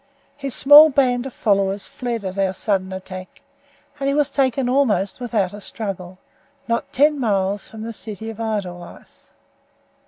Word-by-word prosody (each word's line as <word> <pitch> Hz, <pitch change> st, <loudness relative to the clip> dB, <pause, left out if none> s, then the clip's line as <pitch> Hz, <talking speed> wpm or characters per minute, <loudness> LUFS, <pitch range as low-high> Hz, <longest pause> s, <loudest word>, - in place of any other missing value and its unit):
His 275 Hz, -2 st, -3 dB
small 295 Hz, +3 st, +9 dB
band 260 Hz, -2 st, +1 dB
of 260 Hz, -, -10 dB
followers 195 Hz, -2 st, 0 dB
fled 235 Hz, -4 st, -5 dB
at 190 Hz, +1 st, -4 dB
our 190 Hz, -1 st, 0 dB
sudden 190 Hz, -2 st, -1 dB
attack, 185 Hz, +3 st, -9 dB, 0.6 s
and 275 Hz, 0 st, 0 dB
he 275 Hz, -, 0 dB
was 295 Hz, -2 st, +2 dB
taken 265 Hz, -2 st, +1 dB
almost 235 Hz, -8 st, +1 dB
without 215 Hz, -6 st, -1 dB
a 205 Hz, -, -9 dB
struggle, 190 Hz, -4 st, -6 dB, 0.5 s
not 235 Hz, 0 st, -2 dB
ten 295 Hz, +2 st, +3 dB
miles 200 Hz, -4 st, -1 dB
from 220 Hz, -1 st, -9 dB
the 230 Hz, +1 st, -5 dB
city 220 Hz, 0 st, -6 dB
of 225 Hz, -, -12 dB
Edelweiss. 195 Hz, -6 st, -6 dB
220 Hz, 155 wpm, -21 LUFS, 195-255 Hz, 0.6 s, small